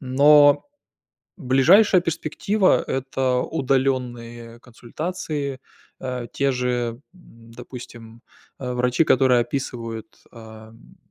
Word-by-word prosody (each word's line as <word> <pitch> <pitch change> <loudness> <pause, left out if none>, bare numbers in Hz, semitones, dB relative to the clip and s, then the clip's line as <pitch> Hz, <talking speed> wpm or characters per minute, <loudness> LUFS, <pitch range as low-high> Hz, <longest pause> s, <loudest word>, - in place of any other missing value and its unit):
но, 145 - +5 0.7
ближайшая 175 - +4
перспектива- 185 +5 0
это 130 -1 -1
удалённые 125 -5 -2
консультации, 140 +2 -6 0.4
э. 125 -2 -5
Те 140 0 0
же, 125 0 -2 0.5
м, 115 -10 -19
допустим, 120 -1 -11 0.4
а, 125 -2 -5
врачи, 125 +5 +1
которые 130 -3 +3
описывают, 120 -3 -5 0.3
ам 110 -1 -15
130 Hz, 85 wpm, -22 LUFS, 120-140 Hz, 0.7 s, но